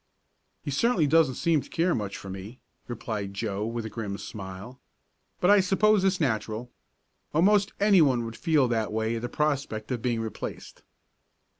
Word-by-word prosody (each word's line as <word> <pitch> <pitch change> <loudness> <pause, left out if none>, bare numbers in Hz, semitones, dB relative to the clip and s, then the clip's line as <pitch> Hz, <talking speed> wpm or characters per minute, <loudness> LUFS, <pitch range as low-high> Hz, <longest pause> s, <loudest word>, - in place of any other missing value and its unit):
"He 145 - -4
certainly 190 - +2
doesn't 150 -3 +3
seem 165 -1 +2
to - - -14
care 170 +1 +1
much 105 -3 -3
for - - -10
me," 95 +6 -8 0.3
replied 105 -4 -5
Joe, 105 0 -2
with 115 -1 -4
a - - -4
grim 105 -4 -4
smile. 100 +6 -8 0.6
"But 180 - +4
I 205 - +7
suppose 195 +2 +3
it's 190 -1 +2
natural. 115 -3 -2 0.6
Almost 200 +4 +4
anyone 160 - +4
would 115 0 -6
feel 155 -4 +2
that 110 -3 0
way 110 +1 -1
at - - -5
the 120 - -4
prospect 140 -7 -2
of 120 -2 -2
being 120 -2 0
replaced." 110 -1 -6
120 Hz, 165 wpm, -27 LUFS, 110-165 Hz, 0.6 s, I